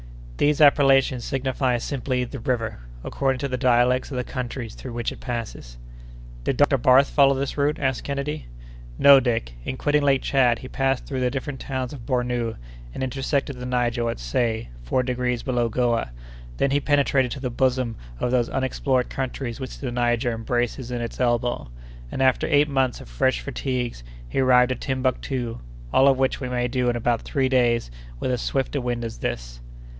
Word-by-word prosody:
These 150 Hz, 0 st, +2 dB
appellations 135 Hz, -3 st, +5 dB
signify 130 Hz, -1 st, 0 dB
simply 125 Hz, 0 st, -2 dB
'the 125 Hz, +2 st, -6 dB
River,' 115 Hz, -, -2 dB, 0.2 s
according 135 Hz, -1 st, 0 dB
to 140 Hz, -, 0 dB
the 130 Hz, -1 st, -2 dB
dialects 125 Hz, 0 st, +3 dB
of 135 Hz, -, -5 dB
the 125 Hz, -, -1 dB
countries 120 Hz, -2 st, -5 dB
through 130 Hz, -, -8 dB
which 120 Hz, -1 st, -2 dB
it -, -, -10 dB
passes." 115 Hz, -, -6 dB, 0.7 s
"Did 130 Hz, -, -1 dB
Dr. 145 Hz, -2 st, +4 dB
Barth 130 Hz, +3 st, +5 dB
follow 140 Hz, -1 st, +5 dB
this 135 Hz, 0 st, -2 dB
route?" 145 Hz, +1 st, +1 dB
asked 130 Hz, -3 st, -1 dB
Kennedy. 140 Hz, -, -4 dB, 0.5 s
"No, 140 Hz, -1 st, +8 dB
Dick: 115 Hz, -, -1 dB
in 130 Hz, -, -4 dB
quitting 145 Hz, +1 st, +2 dB
Lake 140 Hz, -2 st, +2 dB
Tchad, 125 Hz, -4 st, +3 dB
he 130 Hz, -, -9 dB
passed 135 Hz, 0 st, 0 dB
through 135 Hz, -2 st, -3 dB
the 125 Hz, -1 st, +1 dB
different 135 Hz, +1 st, -4 dB
towns 130 Hz, -2 st, -4 dB
of 120 Hz, -5 st, -10 dB
Bornou, 125 Hz, -3 st, -1 dB, 0.4 s
and 130 Hz, -, -5 dB
intersected 135 Hz, +1 st, -2 dB
the 125 Hz, -, -5 dB
Niger 120 Hz, -1 st, 0 dB
at -, -, -3 dB
Say, 110 Hz, -, -1 dB
four -, -, 0 dB
degrees 125 Hz, -1 st, -1 dB
below 120 Hz, -3 st, 0 dB
Goa; 120 Hz, -, 0 dB, 0.5 s
then 140 Hz, -, +1 dB
he 140 Hz, -, +3 dB
penetrated 140 Hz, -3 st, +2 dB
to -, -, -7 dB
the 130 Hz, -2 st, -3 dB
bosom 125 Hz, -1 st, 0 dB, 0.2 s
of 125 Hz, -, 0 dB
those 125 Hz, -2 st, +2 dB
unexplored 130 Hz, -1 st, 0 dB
countries 130 Hz, -2 st, -4 dB
which 130 Hz, -2 st, -6 dB
the 130 Hz, -3 st, -4 dB
Niger 120 Hz, 0 st, +1 dB
embraces 120 Hz, +2 st, -2 dB
in 120 Hz, -1 st, -3 dB
its 115 Hz, -, -5 dB
elbow; 120 Hz, -, 0 dB, 0.4 s
and, 135 Hz, -, -1 dB
after 130 Hz, -1 st, +3 dB
eight 145 Hz, -1 st, +4 dB
months 135 Hz, -3 st, 0 dB
of -, -, -11 dB
fresh -, -, +1 dB
fatigues, 125 Hz, -, -3 dB, 0.2 s
he -, -, -2 dB
arrived 125 Hz, -1 st, +5 dB
at 130 Hz, -, -3 dB
Timbuctoo; 130 Hz, -2 st, -2 dB, 0.3 s
all 135 Hz, -, +6 dB
of 135 Hz, -1 st, +5 dB
which 130 Hz, +1 st, 0 dB
we 130 Hz, -, -3 dB
may 125 Hz, 0 st, 0 dB
do 125 Hz, 0 st, 0 dB
in 120 Hz, -, 0 dB
about 120 Hz, 0 st, 0 dB
three 135 Hz, -2 st, 0 dB
days 120 Hz, -, +2 dB, 0.3 s
with 130 Hz, -, -1 dB
as 125 Hz, -2 st, -1 dB
swift 135 Hz, +1 st, -1 dB
a 140 Hz, -, 0 dB
wind 120 Hz, -1 st, -2 dB
as 115 Hz, -, -7 dB
this." -, -, -4 dB
125 Hz, 190 wpm, -24 LUFS, 120-135 Hz, 0.7 s, No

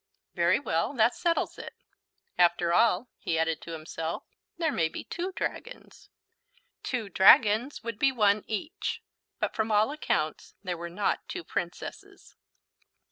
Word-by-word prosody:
"Very 175 Hz, +3 st, +3 dB
well, 170 Hz, -, -1 dB
that 235 Hz, 0 st, +4 dB
settles 340 Hz, -1 st, -1 dB
it. -, -, -8 dB, 0.6 s
After 175 Hz, -1 st, +3 dB
all," 225 Hz, +3 st, +3 dB
he 165 Hz, -, -1 dB
added 160 Hz, -1 st, 0 dB
to 165 Hz, -, -8 dB
himself, 160 Hz, +1 st, -5 dB, 0.3 s
"there 325 Hz, -2 st, +1 dB
may 165 Hz, -, +1 dB
be -, -, -7 dB
two 360 Hz, +2 st, -4 dB
dragons." -, -, -6 dB, 0.7 s
Two 240 Hz, -5 st, -3 dB
dragons 215 Hz, +7 st, +5 dB
would 230 Hz, -2 st, -5 dB
be 275 Hz, -, +4 dB
one 210 Hz, -4 st, +3 dB
each. 315 Hz, -, -4 dB, 0.4 s
But -, -, -1 dB
from 220 Hz, 0 st, 0 dB
all 215 Hz, +4 st, +3 dB
accounts 155 Hz, -, -2 dB
there 180 Hz, -2 st, -2 dB
were 170 Hz, 0 st, -6 dB
not 200 Hz, +4 st, -1 dB
two -, -, -5 dB
Princesses. 175 Hz, +2 st, -6 dB
205 Hz, 140 wpm, -28 LUFS, 170-245 Hz, 0.7 s, dragons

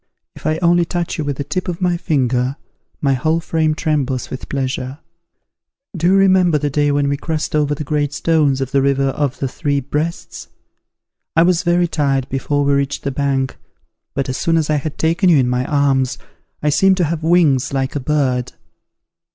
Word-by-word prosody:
If -, -, -6 dB
I 155 Hz, 0 st, +1 dB
only 175 Hz, 0 st, +4 dB
touch 170 Hz, 0 st, -3 dB
you -, -, 0 dB
with 145 Hz, -2 st, -3 dB
the 140 Hz, -, -2 dB
tip 155 Hz, +6 st, -3 dB
of 175 Hz, -2 st, -3 dB
my 180 Hz, -2 st, +1 dB
finger, 130 Hz, -5 st, 0 dB, 0.5 s
my 140 Hz, -2 st, +2 dB
whole 155 Hz, +6 st, +1 dB
frame 160 Hz, -2 st, 0 dB
trembles 140 Hz, -6 st, -1 dB
with 130 Hz, -, -7 dB
pleasure. 130 Hz, 0 st, -3 dB, 1.0 s
Do 170 Hz, 0 st, 0 dB
you 190 Hz, -, +4 dB
remember 185 Hz, -4 st, +4 dB
the 145 Hz, 0 st, -2 dB
day 145 Hz, +1 st, +2 dB
when 145 Hz, 0 st, +1 dB
we 140 Hz, 0 st, 0 dB
crossed 155 Hz, 0 st, -3 dB
over 150 Hz, -1 st, +1 dB
the 150 Hz, -, -5 dB
great 145 Hz, -1 st, -1 dB
stones 150 Hz, -4 st, +1 dB
of 135 Hz, -1 st, -3 dB
the 140 Hz, -, +2 dB
river 135 Hz, 0 st, +2 dB
of 145 Hz, 0 st, -2 dB
the 135 Hz, -, -2 dB
Three 140 Hz, +2 st, -1 dB
Breasts? 150 Hz, +5 st, -4 dB, 0.9 s
I 165 Hz, -, +5 dB
was 175 Hz, -1 st, +3 dB
very 175 Hz, 0 st, +2 dB
tired 140 Hz, -5 st, 0 dB
before 145 Hz, +2 st, -1 dB
we 140 Hz, -, +2 dB
reached 140 Hz, 0 st, -1 dB
the 140 Hz, -, -1 dB
bank: 135 Hz, -1 st, -1 dB, 0.6 s
but, 135 Hz, -, -1 dB
as 130 Hz, -, -3 dB
soon 165 Hz, 0 st, +1 dB
as 155 Hz, -1 st, 0 dB
I 150 Hz, -, +2 dB
had 150 Hz, +1 st, -5 dB
taken 170 Hz, +4 st, +2 dB
you 165 Hz, -, +6 dB
in 130 Hz, -2 st, +2 dB
my 125 Hz, +1 st, 0 dB
arms, 135 Hz, -3 st, +1 dB, 0.5 s
I 150 Hz, -, +2 dB
seemed 190 Hz, +5 st, +4 dB
to 180 Hz, -, +2 dB
have 165 Hz, 0 st, -1 dB
wings 155 Hz, -5 st, +3 dB
like 135 Hz, 0 st, -2 dB
a -, -, 0 dB
bird. 130 Hz, -3 st, 0 dB
145 Hz, 200 wpm, -18 LUFS, 135-165 Hz, 1.0 s, you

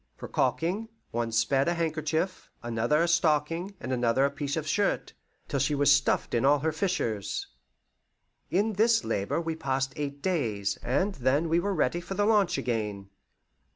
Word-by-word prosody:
For -, -, -7 dB
caulking, 195 Hz, +7 st, 0 dB, 0.2 s
one 115 Hz, 0 st, -2 dB
spared 135 Hz, +5 st, +2 dB
a 175 Hz, -, +1 dB
handkerchief, 160 Hz, +2 st, -2 dB
another 120 Hz, +7 st, +1 dB
a -, -, +1 dB
stocking, 165 Hz, +3 st, +1 dB
and 130 Hz, -, -4 dB
another 120 Hz, +2 st, +2 dB
a 140 Hz, -, 0 dB
piece 145 Hz, +1 st, -3 dB
of 155 Hz, -, -2 dB
shirt, 200 Hz, +6 st, 0 dB, 0.3 s
till 140 Hz, -, -1 dB
she 140 Hz, +2 st, +1 dB
was 145 Hz, 0 st, +4 dB
stuffed 140 Hz, -1 st, +2 dB
in 120 Hz, -, +2 dB
all 145 Hz, +2 st, +5 dB
her 155 Hz, +3 st, -1 dB
fissures. 155 Hz, -, -2 dB, 1.0 s
In 205 Hz, +5 st, +1 dB
this 225 Hz, +3 st, +3 dB
labour 100 Hz, +10 st, -1 dB
we 165 Hz, -1 st, -3 dB
passed 135 Hz, -3 st, -1 dB
eight 140 Hz, -1 st, -4 dB
days, 110 Hz, -, -1 dB
and 185 Hz, +11 st, 0 dB
then 140 Hz, +2 st, +1 dB
were 175 Hz, +4 st, +1 dB
ready 175 Hz, -, +1 dB
for 185 Hz, +3 st, -6 dB
the 205 Hz, -, +2 dB
launch 205 Hz, -5 st, +3 dB
again. 105 Hz, -4 st, -3 dB
150 Hz, 165 wpm, -28 LUFS, 130-175 Hz, 1.0 s, all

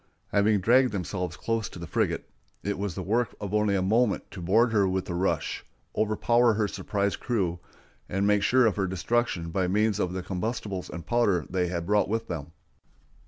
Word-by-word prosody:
Having 100 Hz, 0 st, +3 dB
dragged 125 Hz, +5 st, +4 dB
themselves 90 Hz, -3 st, -3 dB
close 115 Hz, +2 st, -1 dB
to -, -, -11 dB
the 85 Hz, -, -6 dB
frigate, -, -, -1 dB, 0.4 s
it 100 Hz, -1 st, -2 dB
was 100 Hz, -4 st, -3 dB
the 95 Hz, -, -4 dB
work 115 Hz, +4 st, 0 dB
of 100 Hz, -1 st, -5 dB
only 105 Hz, -1 st, +2 dB
a 95 Hz, -, +1 dB
moment 110 Hz, +3 st, +1 dB
to 95 Hz, -, -8 dB
board 110 Hz, +7 st, +3 dB
her 100 Hz, -3 st, +3 dB
with 95 Hz, 0 st, -1 dB
a -, -, -2 dB
rush, 90 Hz, +3 st, -1 dB, 0.3 s
overpower 115 Hz, +2 st, +3 dB
her 105 Hz, -1 st, +1 dB
surprised 100 Hz, 0 st, -2 dB
crew, 95 Hz, -8 st, -1 dB, 0.5 s
and 95 Hz, +1 st, 0 dB
make 105 Hz, 0 st, +3 dB
sure 130 Hz, +4 st, +4 dB
of 110 Hz, -, +2 dB
her 95 Hz, -2 st, +1 dB
destruction 95 Hz, -2 st, -1 dB
by 95 Hz, +1 st, 0 dB
means 105 Hz, +2 st, +1 dB
of 90 Hz, 0 st, -1 dB
the 95 Hz, -1 st, -3 dB
combustibles 95 Hz, 0 st, -3 dB
and 85 Hz, -, -7 dB
powder 105 Hz, -9 st, +2 dB
they 90 Hz, -1 st, +1 dB
had 85 Hz, -1 st, -3 dB
brought 105 Hz, +2 st, +2 dB
with 115 Hz, +2 st, -1 dB
them. 80 Hz, -3 st, -5 dB
100 Hz, 195 wpm, -27 LUFS, 90-110 Hz, 0.5 s, dragged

